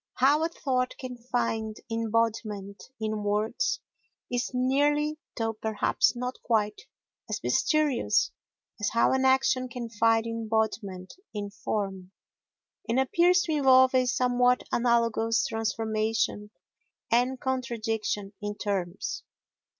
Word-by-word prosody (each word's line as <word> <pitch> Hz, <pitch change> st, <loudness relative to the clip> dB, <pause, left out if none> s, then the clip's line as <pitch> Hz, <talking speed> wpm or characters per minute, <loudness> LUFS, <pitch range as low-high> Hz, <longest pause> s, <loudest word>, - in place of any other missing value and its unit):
How 285 Hz, +5 st, +4 dB
a 325 Hz, -, +1 dB
thought 255 Hz, -5 st, -1 dB
can 255 Hz, -1 st, -6 dB
find 225 Hz, -3 st, -2 dB
embodiment 225 Hz, -3 st, -1 dB
in 215 Hz, -1 st, -2 dB
words 215 Hz, -, 0 dB, 0.5 s
is 245 Hz, 0 st, -1 dB
nearly, 290 Hz, +4 st, +1 dB, 0.2 s
though 225 Hz, -1 st, -1 dB
perhaps 220 Hz, +2 st, +1 dB
not 250 Hz, +1 st, -4 dB
quite, 210 Hz, -3 st, 0 dB, 0.5 s
as -, -, -2 dB
mysterious 305 Hz, -5 st, +2 dB, 0.5 s
as 210 Hz, -, 0 dB
how 230 Hz, -, +4 dB
an 265 Hz, 0 st, +2 dB
action 260 Hz, -1 st, +3 dB
can 235 Hz, -1 st, -6 dB
find 225 Hz, +1 st, +3 dB
embodiment 220 Hz, -4 st, -2 dB, 0.2 s
in 205 Hz, -1 st, -4 dB
form, 195 Hz, -3 st, -4 dB, 0.8 s
and 235 Hz, +3 st, +2 dB
appears 355 Hz, +6 st, +4 dB
to 320 Hz, -, -3 dB
involve 260 Hz, -3 st, +5 dB
a 255 Hz, -1 st, +3 dB
somewhat 250 Hz, 0 st, +2 dB
analogous 230 Hz, -2 st, +2 dB
transformation 220 Hz, -1 st, -1 dB, 0.6 s
and 250 Hz, +2 st, +2 dB
contradiction 225 Hz, -6 st, -2 dB
in 205 Hz, 0 st, -3 dB
terms. 195 Hz, -4 st, -3 dB
230 Hz, 110 wpm, -28 LUFS, 215-255 Hz, 0.8 s, involve